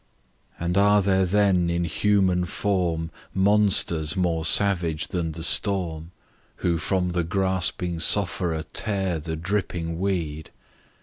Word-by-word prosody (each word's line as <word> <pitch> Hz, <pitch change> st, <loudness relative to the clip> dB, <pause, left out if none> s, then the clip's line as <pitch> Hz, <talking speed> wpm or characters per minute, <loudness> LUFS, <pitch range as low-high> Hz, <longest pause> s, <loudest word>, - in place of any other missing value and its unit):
And 85 Hz, +3 st, -1 dB
are 105 Hz, +1 st, +4 dB
there 95 Hz, -1 st, +1 dB
then 95 Hz, -3 st, +1 dB
in 85 Hz, 0 st, -1 dB
human 95 Hz, +1 st, +1 dB
form 90 Hz, -4 st, -2 dB, 0.2 s
Monsters 95 Hz, -5 st, +2 dB
more 85 Hz, -3 st, -1 dB
savage 85 Hz, -3 st, +2 dB
than 85 Hz, -3 st, -3 dB
the 80 Hz, +1 st, -7 dB
storm, 85 Hz, -4 st, +1 dB, 0.6 s
Who 85 Hz, -2 st, 0 dB
from 90 Hz, +1 st, -1 dB
the 85 Hz, -1 st, -1 dB
gasping 90 Hz, -1 st, -1 dB
sufferer 85 Hz, -3 st, +3 dB
tear 95 Hz, -5 st, -2 dB
The 80 Hz, +1 st, -5 dB
dripping 85 Hz, -2 st, -4 dB
weed? 85 Hz, -6 st, -3 dB
90 Hz, 120 wpm, -23 LUFS, 80-95 Hz, 0.6 s, are